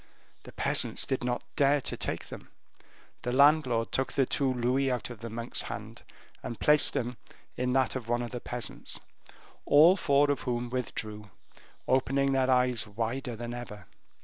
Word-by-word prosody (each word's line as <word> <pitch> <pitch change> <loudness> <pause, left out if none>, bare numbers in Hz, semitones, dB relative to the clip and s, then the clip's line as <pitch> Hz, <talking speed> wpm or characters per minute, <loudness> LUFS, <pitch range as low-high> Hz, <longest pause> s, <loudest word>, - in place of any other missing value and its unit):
The - - -10
peasants - - 0
did 130 -2 -2
not 125 0 -1
dare 145 +1 +4
to - - -3
take - - -4
them; - - -10 0.7
the 125 - -2
landlord 130 -4 +4
took 130 - 0
the 135 - +3
two 135 0 0
louis 130 +2 +1
out 125 -1 -2
of 120 - -9
the 115 - -6
monk's 115 +2 -3
hand - - -7 0.4
and 120 - -6
placed 150 0 +4
them 125 0 -2 0.4
in 125 0 -1
that 130 0 +2
of 120 -3 -5
one 120 0 +1
of 120 - -6
the 125 - -4
peasants, 120 0 -5 0.6
all 160 +6 +7
four 145 -5 +3
of 145 - -2
whom 120 -1 -3
withdrew, 110 -4 -4 0.6
opening 135 +1 +2
their 130 -1 +2
eyes 125 -3 +2
wider 115 +4 -3
than 120 +1 -6
ever. 120 -4 -8
125 Hz, 170 wpm, -29 LUFS, 120-135 Hz, 0.7 s, all